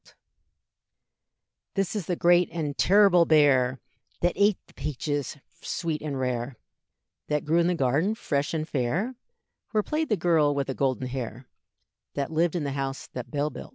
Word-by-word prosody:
This 195 +1 -1
is 200 -6 -3
the 180 - 0
great 175 +1 +4
and 150 -4 -3
terrible 190 -2 +5
bear, 135 -5 +4 0.4
That 175 0 +2
ate 205 -1 +3
the - - -22
peaches 145 0 -3 0.2
sweet 165 -3 -3
and 145 -3 -3
rare, 125 0 -2 0.7
That 150 -1 -1
grew 160 +3 +3
in 170 - +3
the 180 - +1
garden 150 - +1
fresh 145 -7 -1
and 155 0 -2
fair, 155 - -1 0.6
Where 215 -2 +1
played 310 +4 -1
the 215 - +2
girl 160 -4 +3
with 140 -1 0
the 135 - -3
golden 130 -1 0
hair, 125 -1 -5 0.7
That 140 +1 -2
lived 165 +2 +1
in 170 - -1
the 140 - -2
house 135 0 -3
that 125 - -6
Bell 150 0 -1
built. - - -9
150 Hz, 165 wpm, -26 LUFS, 135-175 Hz, 0.7 s, terrible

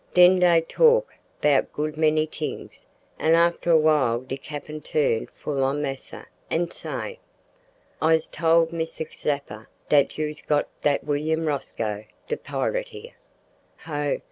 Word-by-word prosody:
Den 180 +1 +7
dey 175 -2 +5
talk 485 - +3 0.3
'bout 145 -2 +3
good 150 +1 -3
many 155 0 +2
t'ings, 155 0 -7 0.3
an' 160 +1 +4
after 170 +1 +2
a 165 - +7
while 150 -7 +3
de 130 +1 -5
cappin 150 +2 -8
turn 140 -9 0
full 140 -2 -3
on 135 +2 0
massa, 135 -2 -6 0.2
an 170 +1 0
say, 485 0 -6 0.8
"`I's 160 0 +3
told 165 0 +2
Missr 160 -1 -3
Zeppa 140 -7 -4 0.2
dat 145 -2 +3
you's 150 0 -3
got 145 -1 +1
dat 145 -1 +1
willain 155 +2 -1
Rosco 110 -8 -3 0.2
de 465 - 0
pirit - - -2
here.' 460 0 -11 0.7
"Ho! 145 -3 -2
155 Hz, 140 wpm, -24 LUFS, 145-170 Hz, 0.8 s, Den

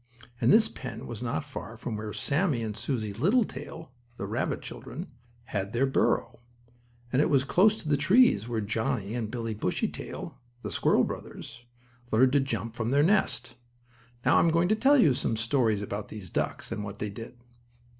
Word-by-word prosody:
And 115 - +5
this 220 0 +6
pen 125 - -8
was 120 -2 -7
not 120 +3 -2
far 120 -5 -8
from 115 -1 -4
where 105 0 -5
Sammie 140 - 0
and 110 -2 -4
Susie 110 -2 -3
Littletail, 160 - -1 0.3
the - - -4
rabbit - - -2
children, - - -7 0.4
had 100 -3 -4
their 125 +3 +3
burrow, 135 -3 +1 0.7
and 130 - +4
it 155 - +2
was 140 -4 +4
close 205 +9 +4
to 155 - -7
the 145 -1 +3
trees 175 - +4
where 115 -2 -1
Johnnie 110 0 -2
and 115 -3 -2
Billie 115 -1 -3
Bushytail, 105 -4 -4 0.2
the - - -4
squirrel - - +3
brothers, 120 +1 -7 0.4
learned 125 +3 +4
to 140 - +4
jump 135 -4 -3
from 115 -1 -2
their 140 +3 +4
nest. 195 +5 +2 0.7
Now - - +5
I - - +7
am 170 - +4
going 170 +2 +2
to 215 - +4
tell 270 +6 +5
you 165 - +5
some 115 -2 -1
stories 110 -3 +1
about 100 0 -5
these 100 -5 -9
ducks, - - -2
and 105 - -3
what 100 0 -7
they 105 0 -4
did. 115 +4 -9
120 Hz, 185 wpm, -28 LUFS, 110-150 Hz, 0.7 s, I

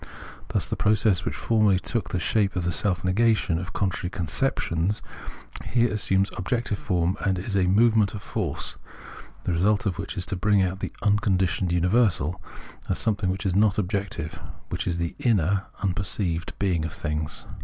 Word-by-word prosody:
Thus - - -1
the - - -2
process, 105 -3 +2
which - - -2
formerly 110 -4 +3
took 110 +2 -2
the 90 - -1
shape 100 +2 +1
of 90 - -1
the 90 - 0
self 90 +3 0
negation 95 -3 +2
of 90 -1 -6
contradictory 90 -3 -1
conceptions, 90 - 0 0.7
here 120 -2 +2
assumes 95 -2 +1
objective 110 +2 -1
form, 90 -1 0
and 95 -1 +1
is 95 +3 -3
a 95 -2 +3
movement 110 +1 +4
of 100 - -7
force, - - -3 0.7
the - - -1
result 100 +5 +2
of 95 -2 -1
which 100 +1 -5
is 90 - -2
to 100 - -3
bring 100 +1 +3
out 95 +1 -2
the - - -4
" - - -21
unconditioned 95 -4 +2
imiversal 90 - +2 0.2
" - - -19
as - - +1
something 100 -4 0
which 95 +2 -3
is 95 - +1
not 105 0 +4
objective 95 -5 -3
— - - -25
which - - -3
is 85 -1 0
the 85 -1 -2
inner 100 -4 +2 0.2
(unperceived) 90 -3 -2
being 90 -5 +1
of 80 - -4
things. 75 +1 -3
95 Hz, 180 wpm, -25 LUFS, 90-105 Hz, 0.7 s, movement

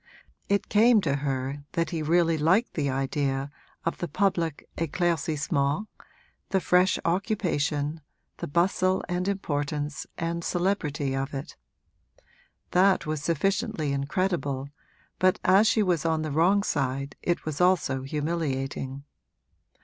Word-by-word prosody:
It 200 0 +1
came 225 +2 +5
to 140 -5 0
her 135 0 -3
that 165 -2 0
he 165 -2 -2
really 165 +1 +3
liked 170 +10 +2
the 145 -3 0
idea 135 +1 -1 0.3
of 165 - -1
the 175 - -2
public 170 -2 0
éclaircissement 160 0 0 0.6
the 190 - +2
fresh 180 +1 +3
occupation, 165 -5 0 0.4
the - - -5
bustle 185 +4 +2
and 180 +1 -1
importance 150 -6 -2
and 170 +1 -2
celebrity 160 -8 -1
of 135 +2 -3
it. 135 - -6 1.2
That 185 0 +4
was 155 -1 -2
sufficiently 190 -1 0
incredible, 140 -2 -1 0.5
but 185 +2 +4
as 195 +4 +5
she 215 - +3
was 175 -6 +1
on 160 -1 +1
the 155 - -3
wrong 180 +7 +3
side 140 -4 -2
it 175 - -1
was 155 0 -3
also 180 -7 +2
humiliating. 135 -2 -3
160 Hz, 125 wpm, -27 LUFS, 140-185 Hz, 1.2 s, came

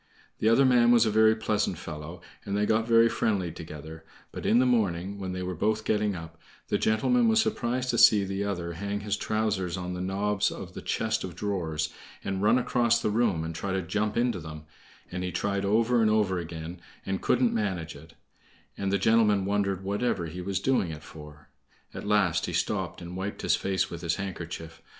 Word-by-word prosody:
The 110 - +3
other 135 +4 +5
man 120 -2 +5
was 120 -1 +6
a 110 - +1
very 110 +1 +5
pleasant 105 -4 -1
fellow, 85 +1 -8 0.2
and 100 -1 -2
they 105 - +2
got 110 +1 +1
very 115 0 +6
friendly 100 -7 0
together; 80 0 -9 0.3
but - - -5
in 115 - +4
the 130 - +4
morning, 100 -5 0
when 95 -1 -4
they 90 0 -4
were 90 0 -3
both 105 +5 0
getting 105 -2 +1
up, 80 -1 -9 0.3
the - - +1
gentleman 230 - +2
was 225 0 +4
surprised 125 - 0
to 115 - 0
see 105 -2 +7
the 95 +1 -2
other 85 -4 -3
hang 100 +4 -4
his 105 0 -1
trousers 105 -4 -1
on 90 0 -4
the 90 - -4
knobs 100 +2 0
of - - -8
the - - -7
chest - - -1
of 90 -3 -6
drawers 80 -6 -2 0.3
and 95 -1 -2
run 105 +4 +4
across 120 -2 +2
the 110 - -1
room 105 -7 +1
and 80 0 -4
try 95 +4 -3
to 95 -1 -1
jump 105 +5 -1
into 120 -5 +1
them, 75 -1 -8 0.5
and 90 0 -3
he 90 - -2
tried 100 +1 -1
over 115 +4 +3
and 110 - +4
over 105 -4 +2
again, 85 +1 -7 0.2
and 95 -1 -2
couldn't 125 -2 +2
manage 95 -7 -2
it; 80 +3 -14 0.6
and 100 -1 -2
the 100 - +3
gentleman 105 -1 +3
wondered 100 -2 0
whatever 100 -2 -1
he 85 +3 -6
was 95 +1 -2
doing 100 -5 +1
it 75 -1 -7
for. 75 -1 -13 0.4
At - - -7
last 105 -5 +2
he - - -4
stopped - - -2
and 85 +1 -7
wiped 95 +2 -5
his - - +3
face 95 -1 -1
with 85 -1 -6
his 85 - 0
handkerchief. 85 -4 -6
100 Hz, 205 wpm, -28 LUFS, 85-110 Hz, 0.6 s, see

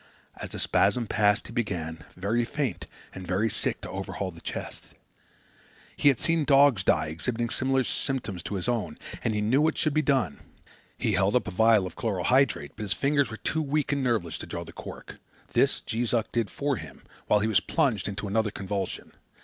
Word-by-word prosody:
As - - -6
the - - -7
spasm 120 -2 +2
passed 105 -1 +2
he 115 - -9
began, 80 -9 -3
very 105 +6 0
faint 130 - -3 0.3
and 95 -1 -8
very 100 +4 +1
sick, - - -2
to - - -7
overhaul 95 0 -4
the 85 0 -13
chest. - - -6 1.1
He - - +2
had 135 -5 +5
seen 165 -1 +2
dogs 140 -7 +5
die 80 -4 +2
exhibiting 115 +9 -2
symptoms 130 0 +1
similar 120 -9 -2
to 100 - -4
his 90 - -2
own, 120 -3 -1 0.3
and 110 -2 0
he 105 - 0
knew 120 +7 +3
what 160 +1 +2
should 155 - +1
be 155 - +3
done. 130 - +1 0.6
He - - 0
held 100 +4 +2
up 120 -4 +2
a - - -3
vial 110 0 +4
of 90 - -7
chloral 100 -6 -2
hydrate, 130 +7 +2
but - - -8
his 100 -2 0
fingers 140 +7 +2
were 110 - -6
too 160 - -1
weak 150 0 0
and 140 -1 0
nerveless 110 -10 0
to - - -7
draw - - -4
the - - -12
cork. - - -9 0.4
This - - +3
Jees 120 +1 -1
Uck 115 -2 -1
did 115 -3 0
for 140 -1 -1
him, - - -10 0.2
while 105 - +4
he 110 - +1
was 105 -5 +4
plunged 110 -3 0
into 100 0 -4
another 110 +2 +1
convulsion. 100 -1 -4
110 Hz, 205 wpm, -27 LUFS, 100-135 Hz, 1.1 s, had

